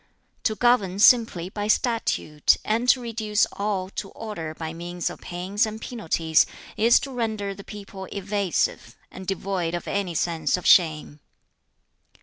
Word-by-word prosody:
"To 215 Hz, -, +2 dB
govern 215 Hz, -6 st, +2 dB
simply 210 Hz, -5 st, +4 dB
by 205 Hz, +1 st, -4 dB
statute, 215 Hz, -, +1 dB
and 230 Hz, +3 st, +1 dB
to 255 Hz, -, +6 dB
reduce 225 Hz, -2 st, 0 dB
all 200 Hz, -2 st, -2 dB
to 195 Hz, -, -5 dB
order 170 Hz, -9 st, -6 dB
by 160 Hz, 0 st, -5 dB
means 175 Hz, +1 st, -4 dB
of -, -, -11 dB
pains 190 Hz, +6 st, -1 dB
and 215 Hz, 0 st, -6 dB
penalties, 165 Hz, -9 st, +1 dB, 0.3 s
is 230 Hz, +2 st, +5 dB
to 275 Hz, -, -6 dB
render 220 Hz, -5 st, -2 dB
the 200 Hz, 0 st, -11 dB
people 200 Hz, -2 st, -9 dB
evasive, 200 Hz, -2 st, -1 dB, 0.2 s
and 185 Hz, 0 st, -10 dB
devoid 190 Hz, -3 st, -2 dB
of 175 Hz, -, -6 dB
any 195 Hz, -4 st, -2 dB
sense 165 Hz, -1 st, 0 dB
of 180 Hz, -, -9 dB
shame. 155 Hz, -4 st, +4 dB
200 Hz, 145 wpm, -24 LUFS, 175-220 Hz, 0.3 s, to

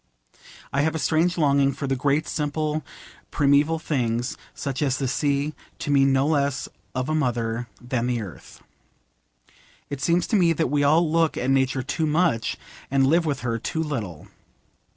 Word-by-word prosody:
I 140 Hz, -, +2 dB
have 160 Hz, +2 st, 0 dB
a -, -, 0 dB
strange 165 Hz, +3 st, +1 dB
longing 140 Hz, -3 st, +3 dB
for 140 Hz, -, -5 dB
the 135 Hz, 0 st, 0 dB
great 140 Hz, +4 st, +1 dB
simple 150 Hz, 0 st, -2 dB, 0.5 s
primeval 145 Hz, +3 st, +3 dB
things, 125 Hz, -6 st, -1 dB, 0.2 s
such 135 Hz, -1 st, -4 dB
as 135 Hz, -3 st, +1 dB
the 135 Hz, -, -1 dB
sea, 140 Hz, +4 st, 0 dB, 0.2 s
to 145 Hz, -, -3 dB
me 140 Hz, -1 st, +5 dB
no 135 Hz, 0 st, +3 dB
less 140 Hz, -3 st, 0 dB, 0.3 s
of 130 Hz, 0 st, -1 dB
a 155 Hz, -, -1 dB
mother 120 Hz, -5 st, -1 dB
than 120 Hz, -1 st, -2 dB
the 125 Hz, -1 st, 0 dB
Earth. 100 Hz, -5 st, -10 dB, 1.3 s
It 140 Hz, -1 st, -4 dB
seems 170 Hz, +3 st, +2 dB
to -, -, +6 dB
me 175 Hz, -4 st, +4 dB
that 160 Hz, -4 st, -1 dB
we 145 Hz, -1 st, +2 dB
all 160 Hz, +4 st, +4 dB
look 165 Hz, 0 st, +1 dB
at 130 Hz, +2 st, 0 dB
Nature 130 Hz, -1 st, +1 dB
too 155 Hz, +4 st, -1 dB
much, 150 Hz, -8 st, +1 dB, 0.3 s
and 135 Hz, 0 st, +3 dB
live 165 Hz, +4 st, +3 dB
with 140 Hz, -3 st, -1 dB
her 115 Hz, -2 st, -2 dB
too 160 Hz, +7 st, -2 dB
little. 110 Hz, -, -5 dB
140 Hz, 170 wpm, -24 LUFS, 130-155 Hz, 1.3 s, to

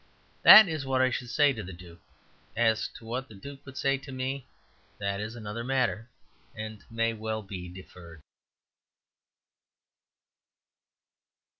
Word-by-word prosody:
That 215 Hz, -2 st, +11 dB
is 155 Hz, -4 st, -3 dB
what 135 Hz, -1 st, 0 dB
I 130 Hz, 0 st, +3 dB
should 125 Hz, -1 st, -4 dB
say 145 Hz, +3 st, +3 dB
to 115 Hz, -, -6 dB
the 95 Hz, -1 st, -8 dB
duke. 85 Hz, -1 st, -14 dB, 0.5 s
As 115 Hz, -1 st, +2 dB
to 115 Hz, -, -12 dB
what 125 Hz, +3 st, -4 dB
the 110 Hz, -, -14 dB
duke 140 Hz, +7 st, -11 dB
would 135 Hz, 0 st, -10 dB
say 135 Hz, 0 st, +1 dB
to 140 Hz, 0 st, -11 dB
me, 130 Hz, +1 st, -4 dB, 0.5 s
that 100 Hz, -1 st, -3 dB
is 110 Hz, +2 st, -6 dB
another 115 Hz, 0 st, -6 dB
matter, 125 Hz, -3 st, -1 dB, 0.5 s
and 110 Hz, -1 st, -7 dB
may 115 Hz, 0 st, 0 dB
well 110 Hz, 0 st, -4 dB
be 95 Hz, -2 st, -8 dB
deferred. 85 Hz, -3 st, -13 dB
115 Hz, 140 wpm, -28 LUFS, 105-130 Hz, 0.5 s, That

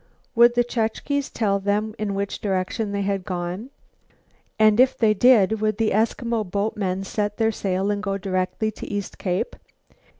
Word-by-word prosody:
Would 240 Hz, +1 st, +5 dB
the 240 Hz, -, +4 dB
Chukches 245 Hz, +4 st, -2 dB
tell 200 Hz, -3 st, 0 dB
them 205 Hz, +2 st, -1 dB
in 205 Hz, -2 st, -2 dB
which 200 Hz, 0 st, -3 dB
direction 195 Hz, +2 st, -1 dB
they 200 Hz, 0 st, -1 dB
had 195 Hz, -1 st, -1 dB
gone? 180 Hz, +6 st, -4 dB, 0.9 s
And 215 Hz, 0 st, +4 dB
if 260 Hz, +1 st, +4 dB
they 220 Hz, -2 st, +4 dB
did, 220 Hz, -2 st, +4 dB
would 215 Hz, -1 st, 0 dB
the 225 Hz, -1 st, +1 dB
Eskimo 230 Hz, +1 st, 0 dB
boatmen 195 Hz, -1 st, -2 dB
set 205 Hz, +1 st, -2 dB
their 225 Hz, -1 st, +2 dB
sail 195 Hz, -1 st, -1 dB
and 205 Hz, 0 st, -2 dB
go 195 Hz, -2 st, -2 dB
directly 190 Hz, +3 st, -1 dB
to -, -, -9 dB
East 205 Hz, -1 st, -5 dB
Cape? 185 Hz, -, -2 dB
210 Hz, 165 wpm, -23 LUFS, 195-220 Hz, 0.9 s, Would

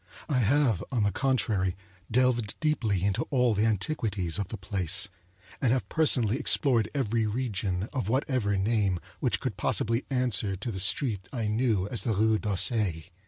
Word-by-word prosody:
I 140 Hz, -5 st, +1 dB
have, 120 Hz, -, +2 dB
on 120 Hz, -5 st, +1 dB
the 100 Hz, -, +1 dB
contrary, 105 Hz, -9 st, 0 dB, 0.3 s
delved 120 Hz, -3 st, +1 dB
deeply 115 Hz, -, 0 dB
into 100 Hz, -1 st, 0 dB
all 125 Hz, -4 st, +2 dB
the 105 Hz, +2 st, +1 dB
antiquities 105 Hz, -, -1 dB
of 100 Hz, -, -2 dB
the 110 Hz, -, -6 dB
place, 100 Hz, +1 st, 0 dB, 0.5 s
and 125 Hz, -4 st, +2 dB
have 130 Hz, 0 st, 0 dB
personally 130 Hz, -7 st, +2 dB
explored 130 Hz, -7 st, +3 dB
every 115 Hz, -4 st, 0 dB
region, 105 Hz, -5 st, -2 dB
of 125 Hz, -8 st, -2 dB
whatever 125 Hz, -5 st, 0 dB
name, 100 Hz, -2 st, +1 dB, 0.2 s
which -, -, 0 dB
could -, -, -4 dB
possibly 115 Hz, +3 st, 0 dB
answer 125 Hz, -7 st, +1 dB
to 115 Hz, +6 st, -5 dB
the 95 Hz, -, -4 dB
street 100 Hz, 0 st, 0 dB
I 120 Hz, -5 st, -3 dB
knew 105 Hz, -3 st, +1 dB
as 115 Hz, -, +1 dB
the 115 Hz, -, 0 dB
Rue 110 Hz, +1 st, +2 dB
d'Auseil. 100 Hz, -4 st, +1 dB
110 Hz, 165 wpm, -28 LUFS, 100-125 Hz, 0.5 s, explored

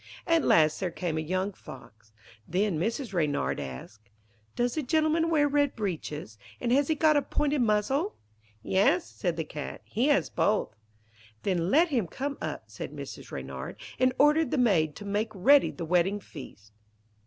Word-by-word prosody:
At 330 Hz, -2 st, +3 dB
last 155 Hz, -1 st, +4 dB
there 185 Hz, -, -1 dB
came 165 Hz, -2 st, -3 dB
a -, -, -1 dB
young 185 Hz, +5 st, -2 dB
Fox. 110 Hz, -, -14 dB, 0.4 s
Then 185 Hz, -1 st, 0 dB
Mrs. 225 Hz, -, -2 dB
Reynard 150 Hz, -5 st, 0 dB
asked: 100 Hz, +11 st, -9 dB, 0.5 s
'Does 240 Hz, 0 st, 0 dB
the 310 Hz, -, -1 dB
gentleman 315 Hz, +3 st, +1 dB
wear 300 Hz, -3 st, +3 dB
red 285 Hz, -1 st, +1 dB
breeches, 155 Hz, -, -5 dB, 0.2 s
and 240 Hz, -, -1 dB
has 275 Hz, +2 st, +3 dB
he 315 Hz, -, +1 dB
got 305 Hz, 0 st, +4 dB
a -, -, +3 dB
pointed 295 Hz, -1 st, 0 dB
muzzle?' 240 Hz, -, +1 dB, 0.5 s
'Yes,' 275 Hz, -, +2 dB
said 175 Hz, -4 st, -3 dB
the 160 Hz, -, -1 dB
Cat. 150 Hz, -1 st, -7 dB
'He 235 Hz, +7 st, 0 dB
has 290 Hz, -1 st, +3 dB
both.' 210 Hz, -, +1 dB, 0.7 s
'Then 180 Hz, -3 st, 0 dB
let 325 Hz, -, +4 dB
him 240 Hz, -, 0 dB
come 280 Hz, -, -4 dB
up,' -, -, -4 dB
said -, -, -8 dB
Mrs. -, -, -9 dB
Reynard, -, -, -6 dB, 0.2 s
and 255 Hz, 0 st, +4 dB
ordered 300 Hz, +2 st, +4 dB
the 305 Hz, -, -1 dB
maid 170 Hz, -, +2 dB
to 205 Hz, -, -9 dB
make 205 Hz, +2 st, -1 dB
ready 275 Hz, +10 st, +5 dB
the 170 Hz, -, -6 dB
wedding 180 Hz, +4 st, +2 dB
feast. 110 Hz, -, -12 dB
210 Hz, 170 wpm, -28 LUFS, -, 0.7 s, ready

